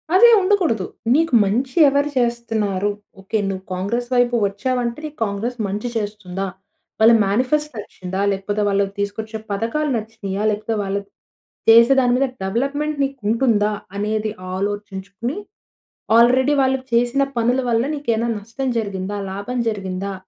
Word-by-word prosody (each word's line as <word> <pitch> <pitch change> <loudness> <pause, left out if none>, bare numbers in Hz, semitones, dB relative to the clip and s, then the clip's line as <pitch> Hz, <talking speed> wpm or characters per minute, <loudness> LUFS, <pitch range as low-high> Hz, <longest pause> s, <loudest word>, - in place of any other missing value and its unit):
అదే 475 +5 +8
ఉండకూడదు. 360 - +1 0.3
నీకు 325 -1 +2
మంచి 250 +6 -1
ఎవరు 285 +1 +2
చేస్తున్నారు? 225 -5 0 0.3
ఓకే. 205 +3 -2
నువ్వు 190 -1 -4
'కాంగ్రెస్' 235 +7 -2
వైపు 245 0 +3
వచ్చావంటే 240 +4 -2
నీకు 305 0 -8
'కాంగ్రెస్' 220 +4 -3
మంచి 205 +5 -3
చేస్తుందా? 205 -3 -4 0.5
వాళ్ళ 225 +2 +7
మేనిఫెస్ట్ 255 +8 0
నచ్చిందా? 190 -2 -5
లేకపోతే 205 +2 -2
వాళ్ళు 200 0 +2
తీసుకొచ్చే 215 +2 -3
పథకాలు 230 +9 -1
నచ్చినాయా? 215 -2 -5
లేకపోతే 215 +2 -2
వాళ్ళు 195 +1 -2 0.7
చేసే 235 +3 +8
దాని 245 -1 +2
మీద 275 +1 +2 0.2
డెవలప్‌మెంట్ 280 +9 -1
నీకు 275 -1 -3
ఉంటుందా? 220 -3 +2 0.3
అనేది 215 +1 -1 0.2
ఆలోచించుకుని 200 - -4 0.8
ఆల్రెడీ 255 +4 +5
వాళ్ళు 265 0 +2
చేసిన 240 +3 +2 0.2
పనుల 245 +3 +2
వల్ల 230 0 +2
నీకైన 235 -5 -1
నష్టం 230 +6 -5
జరిగిందా? 200 -2 -4 0.2
లాభం 200 +6 -4
జరిగిందా? 195 -1 -4
225 Hz, 125 wpm, -20 LUFS, 200-255 Hz, 0.8 s, అదే